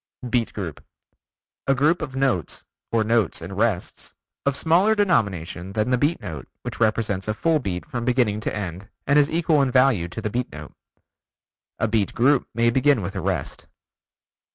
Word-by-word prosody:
Beat 120 -1 0
Group: 90 -8 -5 0.8
A 135 - +4
group 155 +6 +2
of 135 -3 -5
notes 130 - -1 0.3
or 115 -1 +2
notes 110 -4 +1
and 90 +4 -7
rests, 105 -3 -2 0.3
of 140 - +2
smaller 180 +9 +3
denomination 100 - 0
than 110 +4 0
the 125 - +3
beat 150 +5 +1
note 80 -9 -7 0.2
which - - -6
represents 110 -3 0
a 105 - -1
full 160 +7 +2
beat 95 -8 -4
from 120 -2 -4
beginning 120 -4 +1
to 110 - -3
end 95 -1 -5 0.2
and 140 +2 +4
is 145 0 +3
equal 160 -2 +2
in 135 - +2
value 125 -8 +3
to 90 +6 -7
the 105 -2 -3
beat 125 +2 -2
note. 75 0 -10 1.0
(A 110 - 0
beat 110 -3 0
group 130 +2 +3
may 115 0 +3
begin 130 -2 +3
with 95 +2 -4
a 95 - -4
rest.) - - -3
115 Hz, 175 wpm, -23 LUFS, 100-135 Hz, 1.0 s, A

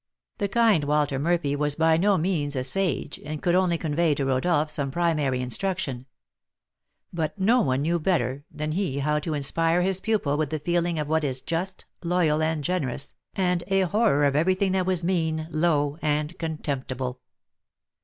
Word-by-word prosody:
The 200 - +1
kind 210 -7 +3
Walter 145 -2 +1
Murphy 155 -2 +1
was 145 0 0
by 160 0 +3
no 195 +4 +3
means 155 -4 -1
a 130 - -1
sage, 180 +7 -1
and 155 0 -5
could 175 +1 +1
only 180 -2 +3
convey 160 -1 +1
to 140 - -1
Rodolph 150 +4 +1
some 140 -2 -1
primary 150 -5 0
instruction; 130 - -2 1.1
but 165 +2 -2
no 225 +6 +3
one 130 - 0
knew 170 +2 +1
better 145 -6 0
than 150 0 -4
he 175 -5 -1
how 150 +2 +1
to 155 +1 -3
inspire 165 +4 +1
his 190 0 0
pupil 200 -10 0
with 155 -2 0
the 155 - -2
feeling 170 +2 0
of 150 -1 -2
what 160 +1 +1
is 130 -2 -2
just, 180 +6 -4 0.2
loyal, 170 -3 +2
and 155 -1 0
generous, 140 -6 -2 0.2
and 180 -2 +1
a 195 -1 +2
horror 190 -6 +2
of 140 -1 +2
every 175 +5 +3
thing 190 0 0
that 185 -1 0
was 185 -2 +1
mean, 160 -3 0
low, 155 -2 +1
and 150 +2 -1
contemptible. 135 -5 -3
160 Hz, 175 wpm, -25 LUFS, 145-180 Hz, 1.1 s, kind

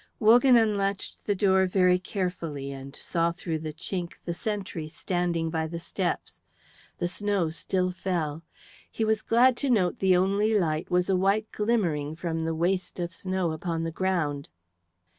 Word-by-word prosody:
Wogan 240 +3 +6
unlatched 200 -3 0
the 205 - +1
door 190 -1 +3
very 180 -1 +3
carefully 170 -7 -4
and 135 +1 -9
saw 170 -1 0
through 170 -2 -4
the 155 0 -5
chink 175 +2 -4
the 170 - -2
sentry 195 -5 -4
standing 170 0 -1
by 160 -1 -1
the 170 +1 -5
steps. - - -3 0.6
The 175 - -1
snow 195 -3 -1
still 180 +3 0
fell; 165 -4 -2 0.5
he 225 - -1
was 220 0 +1
glad 245 +3 +4
to 280 - -1
note 190 -8 +2
the 190 -2 +4
only 200 +4 +2
light 155 -2 -1
was 180 0 +2
a 190 - +2
white 200 +4 +1
glimmering 170 -10 0
from 165 -1 -3
the 165 0 -1
waste 180 +3 -1
of 170 -1 -3
snow 185 -1 -1
upon 165 +1 -3
the 165 - -2
ground. 165 -6 -1
180 Hz, 160 wpm, -27 LUFS, 165-195 Hz, 0.6 s, Wogan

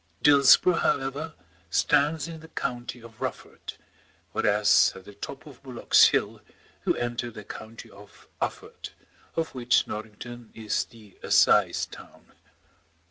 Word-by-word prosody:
Dillsborough, 145 +5 +6
however, 140 +4 -1 0.3
stands 145 - +2
in 165 -1 -8
the 160 - -13
county 120 -4 -5
of 115 -1 -15
Rufford, - - -6 0.6
whereas 105 0 +4
at 95 - -12
the 105 - -12
top 135 +8 -8
of 145 -5 -14
Bullock's 130 -3 +4
Hill - - -1 0.5
you - - +3
enter 120 0 -3
the 105 -2 -10
county 110 +2 -10
of 100 +1 -17
Ufford, - - -5 0.5
of 165 -1 -2
which 125 -2 +2
Norrington 110 +2 -8
is 110 -2 -1
the 110 -4 -18
assize - - +3
town. - - -15
120 Hz, 130 wpm, -26 LUFS, 110-140 Hz, 0.6 s, Dillsborough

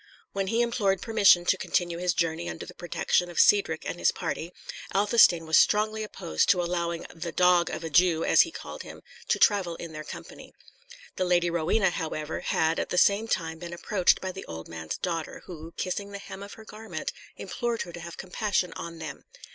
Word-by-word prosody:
When 195 -1 -1
he 230 +4 +2
implored 210 -5 +1
permission 200 -6 +5
to 185 - +3
continue 175 -1 -1
his 180 -1 0
journey 165 0 -1
under - - -6
the - - -11
protection 175 0 0
of 175 - -4
Cedric 180 -6 +4
and 175 - -4
his - - +3
party, 165 +2 -4 0.4
Athelstane 200 -5 +5
was 160 0 +5
strongly 215 +1 +2
opposed 80 - -1
to 180 -3 +4
allowing 170 -1 -2
the 170 0 -5
"dog 180 0 +4
of - - -5
a 165 - -4
Jew," 165 +1 +4
as - - +6
he 335 - +1
called - - -8
him, - - -11 0.2
to - - +2
travel 190 -5 +3
in 165 -1 -8
their 155 0 -6
company. - - -10 0.6
The 185 - +1
Lady 175 -1 +2
Rowena, 175 +4 +2
however, 155 -3 -4
had 160 +1 +1
at - - -2
the 180 - -2
same 205 +4 +4
time 160 -6 -2
been 170 0 -7
approached 185 +1 +2
by 190 - -3
the 190 - -8
old 80 0 -8
man's 80 -1 -5
daughter, 165 -3 -4
who, 165 -2 -9
kissing 200 +2 -3
the - - -4
hem 200 0 -9
of 200 0 -8
her 220 - -13
garment, 220 +1 -6 0.2
implored 240 -2 -2
her 175 - -11
to 175 - -7
have 170 0 -8
compassion 190 -1 -1
on 170 0 -7
them. 155 -4 -7
175 Hz, 205 wpm, -27 LUFS, 165-200 Hz, 0.6 s, as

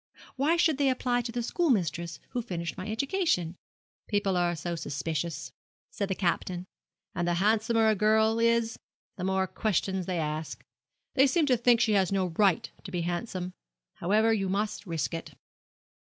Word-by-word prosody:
Why 295 +6 +2
should 320 -4 +3
they 280 -1 +4
apply 250 -1 +1
to 235 0 -5
the 240 0 -2
schoolmistress 185 - 0
who 245 - -2
finished 170 -6 -4
my 185 - -6
education?' 225 - 0 0.5
'People 205 -3 +1
are 175 -1 +1
so 170 +2 -4
suspicious,' 155 +2 -3 0.4
said 200 - -2
the 190 - 0
Captain, 180 0 -1 0.5
'and 175 0 -1
the 175 - +2
handsomer 220 +4 +3
a 220 - +5
girl 220 +2 +3
is 230 0 +2 0.4
the 180 - -4
more 190 0 +1
questions 190 -2 -1
they 180 -2 -1
ask. 155 0 -3 0.5
They 270 +1 +5
seem 320 +3 +2
to 260 -3 +4
think 240 0 +4
she 220 - +3
has 195 -3 +3
no 195 -1 +1
right 195 -3 +3 0.2
to - - -7
be 180 -2 -2
so - - -3
handsome. 180 +1 -3 0.4
However 215 +5 +3
you 195 -3 0
must 205 +1 -2
risk 165 -1 -2
it.' 165 - -6
200 Hz, 170 wpm, -29 LUFS, 175-230 Hz, 0.5 s, a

